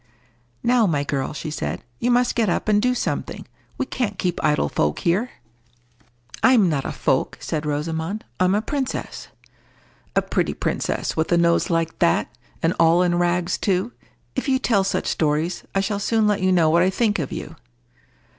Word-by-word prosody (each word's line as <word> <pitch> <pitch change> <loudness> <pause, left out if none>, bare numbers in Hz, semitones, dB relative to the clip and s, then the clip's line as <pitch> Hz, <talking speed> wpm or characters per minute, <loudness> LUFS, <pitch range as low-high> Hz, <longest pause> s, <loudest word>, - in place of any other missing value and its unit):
"Now, 240 -2 +4
my 145 -5 0
girl," 140 -2 -2
she 155 +1 -5
said, 75 - -4 0.2
"you 245 - 0
must 245 0 +3
get 225 -4 +1
up, - - -1
and 210 -1 +3
do 250 +2 +2
something. 245 - -3 0.3
We - - -1
can't 220 -7 -3
keep 180 -2 -2
idle 150 - +2
folk 75 0 0
here." 195 +9 +1 1.1
"I'm 245 -7 +5
not 145 -5 -1
a - - -2
folk," - - 0
said 150 -1 -3
Rosamond; 160 +7 -3
"I'm 185 +1 +3
a 210 - 0
princess." 270 -1 -4 0.9
"A - - +3
pretty - - -1
princess—with 160 +2 -2
a 175 - +4
nose 170 0 +2
like 165 -1 -1
that! 170 -8 +1 0.3
And 165 +2 +3
all 165 +2 +5
in 175 -1 +1
rags 175 0 0
too! 195 +4 0 0.4
If - - -2
you 260 - +3
tell 225 -6 +2
such 195 - -1
stories, 155 +3 -1
I 195 - +3
shall 200 +1 -2
soon 220 +1 +1
let 210 -2 +1
you 185 0 +2
know 165 -4 +4
what 170 +1 +4
I 185 - +4
think 210 0 +1
of 145 - -3
you." 165 - -6
180 Hz, 180 wpm, -22 LUFS, 160-215 Hz, 1.1 s, I'm